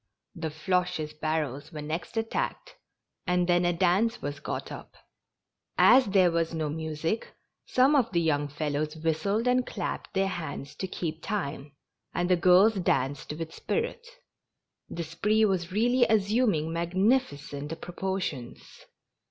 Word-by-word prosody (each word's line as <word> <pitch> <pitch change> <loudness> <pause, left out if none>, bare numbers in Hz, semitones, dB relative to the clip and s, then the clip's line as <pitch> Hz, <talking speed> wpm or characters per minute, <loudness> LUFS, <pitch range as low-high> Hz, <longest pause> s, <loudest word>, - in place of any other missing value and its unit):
The 165 -4 -4
Floches' 175 -1 -1
barrels 155 -3 -2
were 150 -3 -6
next 160 +8 -5
attacked, 225 - -2 0.5
and 180 0 +2
then 175 0 +3
a 175 - +3
dance 190 +7 +2
was 145 0 -5
got - - -5
up. - - -9 0.8
As 255 -2 +7
there 190 -3 +4
was 165 0 0
no 155 -2 -1
music, 160 +6 -3 0.3
some 265 +4 +4
of 245 -5 +2
the 175 - +2
young 145 -3 +1
fellows 150 +1 -2
whistled 165 +9 0
and 250 0 +3
clapped - - -5
their 195 0 +2
hands 160 -6 -5
to 190 - -3
keep 160 -3 -4
time, 145 -8 -4 0.4
and 175 +1 0
the - - +7
girls 185 +5 +6
danced 145 -7 -1
with 160 +1 -6
spirit. 470 +1 -3 0.8
The 170 - -4
spree 210 +7 +2
was 185 -3 -1
really 240 +5 +3
assuming 205 -6 +2
magnificent 165 - 0
proportions. 180 -9 -5
175 Hz, 135 wpm, -28 LUFS, 155-205 Hz, 0.8 s, As